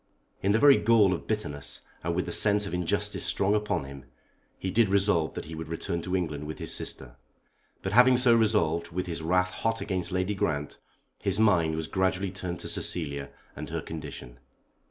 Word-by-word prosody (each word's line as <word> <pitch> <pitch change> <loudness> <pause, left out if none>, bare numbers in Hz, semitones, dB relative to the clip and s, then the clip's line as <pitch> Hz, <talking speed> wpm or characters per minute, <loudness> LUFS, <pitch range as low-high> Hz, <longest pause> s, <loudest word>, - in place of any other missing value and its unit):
In 100 - +2
the 105 - +4
very 140 +3 +7
gall 110 -5 +4
of 85 - -5
bitterness, 75 -10 -3 0.2
and 85 +1 -1
with 90 - 0
the - - -5
sense 105 -1 +3
of 100 - -6
injustice 105 +4 -1
strong 100 +1 +1
upon 105 -8 0
him, 70 -1 -10 0.5
he 95 - -3
did 115 -1 +3
resolve 100 -5 +2
that - - -5
he 80 - -9
would 80 -1 -6
return 85 +1 -3
to 90 +2 -2
England 75 -5 -3
with 80 - -6
his - - -1
sister. - - -3 0.7
But 95 - -2
having 125 +3 +6
so 125 -2 +5
resolved, 105 -7 +2
with 90 +2 -3
his 85 -2 -4
wrath 90 +3 +1
hot 115 +3 -1
against 95 -2 -2
Lady 95 +2 0
Grant, 75 -6 -2 0.4
his 100 +1 -1
mind 85 -7 +3
was 80 0 -3
gradually 95 +2 0
turned 90 -2 -5
to - - -5
Cecilia 70 -5 -2 0.3
and - - -7
her - - -3
condition. 70 -6 -8
90 Hz, 195 wpm, -28 LUFS, 80-105 Hz, 0.7 s, very